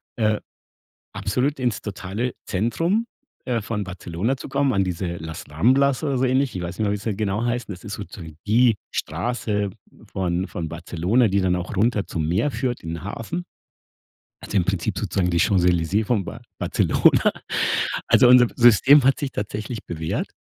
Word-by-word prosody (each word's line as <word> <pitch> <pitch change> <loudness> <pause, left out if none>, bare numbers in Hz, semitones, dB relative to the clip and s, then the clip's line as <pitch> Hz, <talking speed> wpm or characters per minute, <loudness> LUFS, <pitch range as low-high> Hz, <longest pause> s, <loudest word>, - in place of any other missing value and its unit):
äh, 110 -2 +1 0.7
absolut 130 +7 -1
ins 120 -5 0
totale 105 +4 -4
Zentrum, 165 - 0 0.4
äh, 120 -3 0
von 105 0 -3
Barcelona 95 +6 -3
zu - - -9
kommen, 140 0 +1
an 95 - +2
diese 90 0 -3
„Las 80 +3 -7
Ramblas“ 130 - +3
oder 140 -4 0
so 130 - +1
ähnlich. 130 -2 +1
Ich 90 - -3
weiß 85 +1 -5
nicht 110 - +1
mehr, 100 - +1
wie - - 0
sie 105 +2 -3
da 100 - -3
genau 105 +1 -1
heißen. 120 -3 -2
Das 90 - -11
ist 105 - -6
so - - -5
zu 100 - -12
sagen 80 -3 -10
die 115 +2 +4 0.2
Straße 105 +4 -2 0.4
von 90 -1 -1
von 80 -2 -4
Barcelona, 90 +8 +1
die 100 +1 +1
dann 95 -1 +2
auch 90 +2 -5
runter 105 +1 +1
zum 80 -2 -2
Meer 100 - +1
führt 120 0 -2
in 80 - -6
den 85 0 -6
Hafen. 115 - -5 1.0
Also, 105 - -2
im 90 - +2
Prinzip 95 -3 -1
sozusagen 90 -2 0
die 85 - +1
Champs-Élysées 90 +2 +2
von 105 -5 0
Bar - - -8 0.2
Barcelona. - - +3 0.8
Also, 125 - +6
unser 125 -1 +7
System 125 +4 +6
hat 135 +1 +3
sich 140 - -2
tatsächlich 105 +2 -5
bewährt. 80 -1 -3
105 Hz, 180 wpm, -23 LUFS, 90-125 Hz, 1.0 s, unser